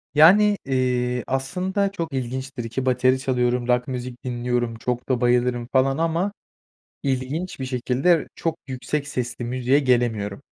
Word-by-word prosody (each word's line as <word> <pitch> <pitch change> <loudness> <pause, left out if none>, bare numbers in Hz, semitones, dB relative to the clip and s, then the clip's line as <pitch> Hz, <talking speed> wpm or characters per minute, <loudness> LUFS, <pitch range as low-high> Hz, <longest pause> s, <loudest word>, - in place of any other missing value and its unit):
Yani, 200 +7 +7
eee, 125 -2 0
aslında 185 +9 -1
çok 165 -6 -4
ilginçtir 130 -1 -4
ki 130 +3 -3
bateri 130 0 +3
çalıyorum, 125 -2 0
rock 125 0 +2
müzik 125 -1 -5
dinliyorum, 120 -1 -1
çok 125 +2 -3
da 130 -2 +1
bayılırım 120 0 +2
falan 135 +1 +3
ama 165 +4 0 0.7
ilginç 140 +6 -2
bir 130 - -3
şekilde 130 +6 +1
çok 165 -1 -2
yüksek 140 +3 -3
sesli 125 -3 -3
müziğe 130 +3 +2
gelemiyorum. 120 -6 0
130 Hz, 135 wpm, -23 LUFS, 125-140 Hz, 0.7 s, Yani